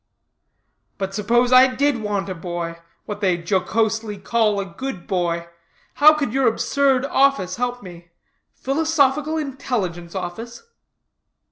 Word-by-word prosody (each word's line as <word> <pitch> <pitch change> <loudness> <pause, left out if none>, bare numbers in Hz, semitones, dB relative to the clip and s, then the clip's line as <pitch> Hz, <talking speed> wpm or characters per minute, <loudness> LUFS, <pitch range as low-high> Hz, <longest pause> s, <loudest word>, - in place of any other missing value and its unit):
"But 195 -1 -4
suppose 235 +5 +1
I 255 0 +6
did 280 -4 +1
want 205 -2 -2
a 190 - -3
boy 170 -1 -5 0.3
what 210 0 -6
they 185 -3 +2
jocosely 210 +4 -1
call 210 +1 +1
a 200 - -2
good 195 0 -7
boy 170 -2 -1 0.5
how 305 +1 +6
could 285 -7 -2
your 270 -2 +2
absurd 270 +3 +1
office 270 -10 +1
help 245 -1 -3
me? 175 -2 -12 0.5
Philosophical 300 +1 +1
Intelligence 210 - -4
Office?" 225 - -6
220 Hz, 125 wpm, -21 LUFS, 185-265 Hz, 0.5 s, I